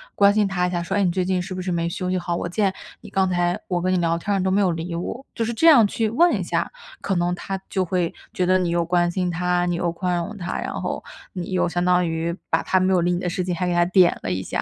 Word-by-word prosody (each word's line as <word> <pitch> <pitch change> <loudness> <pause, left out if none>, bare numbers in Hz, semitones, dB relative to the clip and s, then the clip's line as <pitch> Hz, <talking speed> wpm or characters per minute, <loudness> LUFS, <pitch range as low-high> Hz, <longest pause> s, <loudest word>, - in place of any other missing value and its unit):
关 200 0 +5
心 210 -2 +2
他 180 -2 0
一 180 - -1
下， 175 -1 -1
说： 190 +3 -3
“哎， 200 - +2
你 175 - +2
最 185 0 -1
近 185 -1 0
是 185 +1 -6
不 185 - -4
是 180 0 -3
没 170 0 -1
休 180 +1 -3
息 185 - 0
好？ 175 -1 -3
我 - - -3
见 195 +1 0 0.3
你 - - -11
刚 190 -1 +1
才 175 0 0
我 175 -2 -1
跟 185 +1 0
你 - - +2
聊 170 -1 +1
天 200 +4 -2
儿 190 - 0
都 190 - +1
没 195 +2 +2
有 185 -3 +3
理 170 +1 -4
我。” 235 +9 -5
就 230 - -1
是 235 +1 -2
这 325 +9 +3
样 255 -9 +8
去 220 +1 -1
问 340 +10 +4
一 - - -2
下， - - -1 0.3
可 195 - -1
能 175 +1 0
他 195 +1 -5
就 190 - 0
会 180 -1 -1 0.2
觉 180 - 0
得 185 +1 +4
你 180 -2 0
又 170 0 +1
关 175 0 +2
心 180 0 -1
他、 180 +1 0
你 175 -1 0
又 175 -1 -1
宽 180 +1 -2
容 175 +5 -4
他， 175 -1 -4
然 - - -4
后 - - -4 0.3
你 180 0 -5
又 180 -1 +1
相 175 0 -1
当 180 -1 +3
于 165 +1 -2 0.2
把 - - +1
他 185 - +2
没 185 +1 +2
有 175 - +3
理 175 - +1
你 175 - 0
的 180 - -2
事 180 +1 -2
情， 180 -1 -2
还 180 +1 -2
给 175 - 0
他 175 - +4
点 180 0 +4
了 - - -2
一 95 +1 -1
下。 - - -3
180 Hz, 335 characters per minute, -23 LUFS, 175-190 Hz, 0.3 s, 样